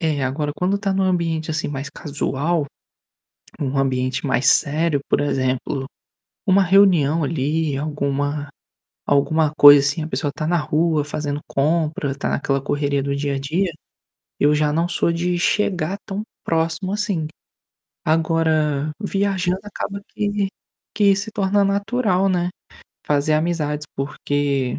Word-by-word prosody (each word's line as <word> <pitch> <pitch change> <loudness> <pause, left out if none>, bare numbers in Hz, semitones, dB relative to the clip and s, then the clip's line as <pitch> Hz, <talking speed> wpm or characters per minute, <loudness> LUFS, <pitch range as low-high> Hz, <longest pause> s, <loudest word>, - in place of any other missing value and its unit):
É. 150 -5 0
Agora 145 +3 -2
quando 190 +4 0
tá 200 -2 -1
num 195 0 +1
ambiente, 165 -3 0
assim, 155 0 -2
mais 140 -1 -5
casual, 145 +2 -2 0.9
num 135 -1 -2
ambiente 130 -1 0
mais 125 0 +1
sério, 155 +1 +3
por - - +2
exemplo, 135 -1 -1 0.6
uma 195 +1 +5
reunião 175 -5 +4
ali, 150 0 -1
alguma 145 0 -2 0.6
alguma 150 +2 +2
coisa 145 -1 +10
assim, 140 +3 0
a 155 - -4
pessoa 150 -2 -2
está 155 +1 -4
na 175 +2 +2
rua, 155 0 +1
fazendo 145 0 -3
compra, 150 -1 0
está 140 - -3
naquela 140 -1 0
correria 140 0 -1
do 140 0 -2
dia 140 0 -1
a - - -2
dia, 170 +7 -1 0.7
eu 150 +1 +4
já 150 0 +1
não 165 +2 +1
sou 170 -1 +1
de 175 +1 -1
chegar 185 -1 0
tão 200 +2 -4 0.2
próximo 165 +3 -1
assim. 200 -7 -1 0.8
Agora, 155 -2 +1
viajando 195 -2 0
acaba 200 -1 -5
que 205 -1 -1 0.5
que 205 -2 +4
se 205 +3 -4
torna 200 -1 +2
natural, 200 -1 +1
né, 175 -1 0 0.6
fazer 145 +1 +1
amizades, 155 -2 -1
porque 140 -1 -1
155 Hz, 140 wpm, -21 LUFS, 145-180 Hz, 0.9 s, coisa